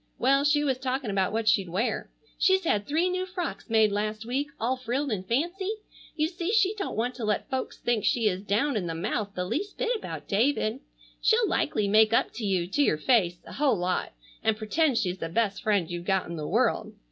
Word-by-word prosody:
Well, 275 +2 +3
she 295 0 +3
was 265 -3 0
talking 260 -3 -2
about 190 -1 +1
what 225 0 -2
she'd 200 -5 +3
wear. 200 +8 -1 0.3
She's 380 0 +4
had 205 -11 0
three 320 +5 +2
new 370 0 -2
frocks 360 -7 -5
made 220 -2 +4
last 215 +2 -2
week, 265 +5 -1
all 245 +4 +1
frilled 255 +2 -2
and 195 -4 -2
fancy. 345 - -1 0.5
You 305 0 +1
see 345 +2 -3
she 420 -3 +4
don't 405 -2 -4
want 240 +4 -1
to 240 - -5
let 210 -1 0
folks 260 -1 -3
think 240 -3 0
she 230 -3 +2
is 185 -2 0
down 225 +8 0
in 190 -5 -1
the 165 - -3
mouth 200 +4 -2
the 180 - -2
least 395 - -3
bit - - 0
about 435 - -6
David. 225 +2 +1 0.4
She'll 445 0 +4
likely 220 - 0
make 215 +2 +5
up - - +2
to 225 - -6
you, 190 -4 +1
to 190 +11 0
your 155 - +3
face, 175 -2 +2
a - - -10
whole 275 -6 +2
lot, 180 - -1 0.3
and 220 -1 +2
pretend 255 +5 +1
she's 180 -3 -1
the 165 - -4
best 205 +2 0
friend 205 -7 +1
you've 175 0 -5
got 190 -1 +1
in 170 - -5
the 155 -2 -4
world. - - +1
230 Hz, 220 wpm, -27 LUFS, 200-290 Hz, 0.5 s, make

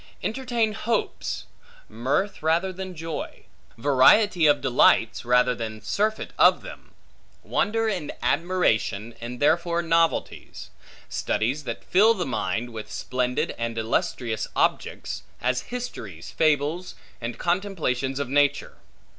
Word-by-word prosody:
Entertain 235 -2 0
hopes; 220 +1 -2 0.4
mirth 130 - -1
rather 170 +4 +1
than 185 0 -7
joy; 165 -1 -6 0.3
variety 155 - +5
of 145 - +4
delights, 120 -3 +3
rather 125 +1 +3
than 110 -2 -5
surfeit 210 - -1
of - - +5
them; - - -12 0.5
wonder 225 +2 0
and 180 -9 -2
admiration, 120 - +1
and 120 +1 -6
therefore 170 +3 +2
novelties; 165 0 -1 0.4
studies 135 +7 -1
that 115 -2 -5
fill 215 +5 +4
the 180 - -2
mind 115 -1 -2
with 110 -1 -7
splendid 125 0 -1
and 115 0 -3
illustrious 110 0 -1
objects, - - -1 0.2
as 125 +1 0
histories, 115 - -6
fables, 155 +3 0 0.3
and 115 0 -4
contemplations 170 -8 -1
of 140 -2 -2
nature. 145 +2 +1
145 Hz, 115 wpm, -25 LUFS, 120-185 Hz, 0.5 s, variety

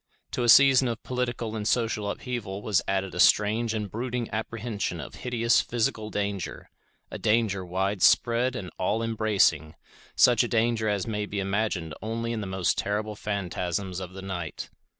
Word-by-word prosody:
To - - -2
a 120 - +2
season 135 0 +7
of 115 -1 -4
political 120 -3 -3
and 105 -1 -3
social 110 -4 0
upheaval 105 -4 -5
was 100 -3 +2
added 95 -1 -1
a 90 - -6
strange 110 +4 +3
and 105 -1 -2
brooding 120 +3 -4
apprehension 110 -4 -3
of 75 - -8
hideous 115 -3 +1
physical 110 -2 -1
danger; 100 -3 -4 0.4
a - - -6
danger 105 -3 +1
widespread 100 +7 +2
and 95 -7 -6
all 105 +5 0
embracing, 105 -8 +1 0.4
such 120 -1 +5
a - - -1
danger 115 -1 +1
as 100 -2 -1
may 105 -2 -3
be 100 - -3
imagined 95 -5 -1
only 115 +2 -3
in 110 - -3
the 100 - -5
most 95 -1 0
terrible 105 +1 -2
phantasms 95 -2 -3
of 95 -1 -7
the 95 0 -8
night. 90 -5 -5
105 Hz, 165 wpm, -27 LUFS, 95-115 Hz, 0.4 s, season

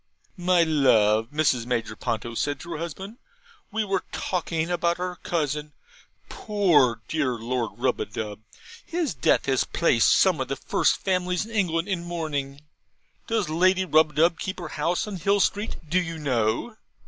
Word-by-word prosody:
'My 180 -2 +3
love,' 115 -8 +3
Mrs. 135 -5 +1
Major 115 -3 -2
Ponto 115 0 -3
said 145 +5 -2
to 170 - -9
her 160 - -4
husband, 190 - -6 0.5
'we 220 +1 -1
were 195 -1 0
talking 165 -2 -2
of 175 -1 -2
our 180 +1 0
cousin 150 -3 -2 0.5
poor 160 - +2
dear 150 -5 0
Lord 120 +1 -3
Rubadub. 105 -2 -2 0.4
His 335 - -2
death 130 -4 +2
has 135 -2 +2
placed 125 -9 +2
some 180 -7 +4
of 130 - -2
the 135 - -2
first - - +1
families 180 0 -1
in 225 - -12
England 180 -5 0
in 185 -4 -2
mourning. 145 -5 -4 0.7
Does 225 -5 0
Lady 185 +4 +2
Rubadub 155 +1 +3
keep 190 - -4
the 175 -3 -6
house 170 +8 -1
in 205 -3 -5
Hill 200 +4 +2
Street, 205 +3 0
do 175 +5 +2
you 165 -2 -5
know?' 130 - -1
165 Hz, 155 wpm, -25 LUFS, 135-185 Hz, 0.7 s, some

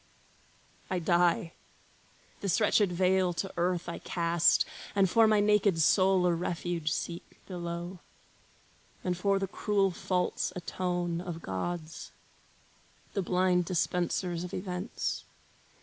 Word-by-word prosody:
I 185 - 0
die! 175 0 +2 0.9
This 195 0 +1
wretched 210 -3 +3
veil 185 0 +2
to 195 +3 -4
earth 175 0 0
I 170 - -5
cast, 170 -1 +2 0.3
And 195 -1 +4
for 225 +4 +5
my 215 -1 +4
naked 205 -4 +3
soul 185 +3 +4
a 175 - +3
refuge 170 -1 -2
seek 170 +1 -5
Below, 175 0 -5 1.0
and 180 -1 0
for 195 +2 +1
the 195 - -1
cruel 200 0 +1
faults 180 +1 -1
atone 175 -1 -2
Of 175 -2 -6
gods, 160 - -4 1.0
the 200 - 0
blind 180 -1 +2
dispensers 175 0 -1
of 180 - -6
events. 185 +2 -3
180 Hz, 120 wpm, -30 LUFS, 170-190 Hz, 1.0 s, for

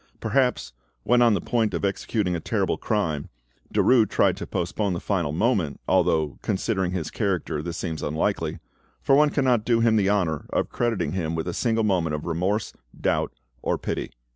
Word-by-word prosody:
Perhaps, 125 - 0 0.3
when 120 0 +4
on 115 -3 +5
the - - 0
point 110 -5 0
of 85 - -1
executing 100 -1 -1
a - - -2
terrible - - 0
crime, 80 -10 -1 0.4
Derues 115 -5 +4
tried - - +3
to - - -6
postpone 90 +3 -1
the 85 - -2
fatal 85 -7 -1
moment, 90 - 0
although, 85 -5 +2
considering 95 -2 -1
his 90 -4 -3
character, 95 -7 -1
this 85 +1 -5
seems 80 -5 -4
unlikely, 80 +2 -1 0.5
for - - +3
one 150 +2 +6
cannot 130 -6 +2
do 115 0 +2
him 115 -1 +4
the 100 -2 +2
honour 90 -7 0
of - - -1
crediting 120 -3 -1
him 85 -3 -2
with 80 +1 -3
a 90 - -2
single 115 -2 +1
moment 90 -7 +1
of 75 - -6
remorse, 90 +6 -1 0.3
doubt, - - 0 0.3
or - - 0
pity. - - -3
95 Hz, 180 wpm, -25 LUFS, 85-115 Hz, 0.5 s, one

